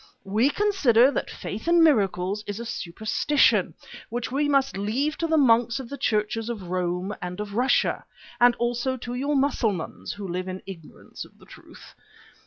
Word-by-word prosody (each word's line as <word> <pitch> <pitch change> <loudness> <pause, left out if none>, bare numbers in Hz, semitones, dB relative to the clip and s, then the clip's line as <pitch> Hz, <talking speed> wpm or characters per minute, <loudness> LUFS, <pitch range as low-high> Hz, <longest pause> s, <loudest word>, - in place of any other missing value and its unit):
We 215 +7 +2
consider 290 - +3
that - - -3
faith 220 +10 -7
in 340 -1 +5
miracles 200 - +2
is 205 +1 -4
a 235 - -6
superstition 220 +9 +1 0.3
which 240 +1 -4
we 290 +2 0
must 275 -3 +2
leave 240 +10 -1
to 330 - 0
the 320 0 +2
monks 235 -2 +3
of 255 -3 -8
the 280 - -6
Churches 215 +1 -1
of 205 -7 -6
Rome 180 +2 -2
and 180 +1 -6
of 210 -1 -5
Russia, 250 +5 +1 0.4
and 240 0 +5
also 240 +2 -1
to 240 0 -6
your 280 +4 -1
Mussulmans 230 - -1
who 200 -1 -7
live 180 +1 -4
in 185 0 -6
ignorance 175 -5 -10
of - - -18
the - - -18
truth. - - -15
230 Hz, 175 wpm, -25 LUFS, 200-270 Hz, 0.4 s, in